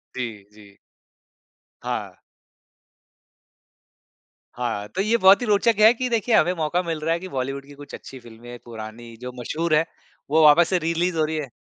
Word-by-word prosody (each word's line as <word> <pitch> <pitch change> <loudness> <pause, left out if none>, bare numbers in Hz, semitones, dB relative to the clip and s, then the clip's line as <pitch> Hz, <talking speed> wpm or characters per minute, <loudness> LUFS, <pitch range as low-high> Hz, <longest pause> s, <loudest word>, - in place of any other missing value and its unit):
जी, 115 -6 -6
जी। 100 -2 -18 1.1
हाँ। - - -4 2.4
हाँ, 115 -4 -3
तो 185 - -3
ये 220 +4 +2
बहुत 195 +2 +6
ही - - -1
रोचक 210 +2 +3
है 215 +2 +7
कि 250 +1 -3
देखिए, 230 0 +1
हमें 175 +3 +3
मौका 165 +3 0
मिल 165 -3 -3
रहा 165 +2 0
है 170 - -2
कि 185 - -8
बॉलीवुड 135 -1 -4
की 145 - -14
कुछ 145 0 -13
अच्छी 135 - -11
फ़िल्में, 120 +1 -12
पुरानी, 115 0 -9
जो 125 +1 -7
मशहूर 155 +6 -1
हैं, 160 +2 +3 0.4
वो 160 +2 +4
वापस 160 +3 +6
से 185 - +2
री-रिलीज़ 170 +1 -1
हो 155 - +2
रही 160 +1 -3
हैं। 145 -4 -4
155 Hz, 175 wpm, -23 LUFS, 120-180 Hz, 2.4 s, है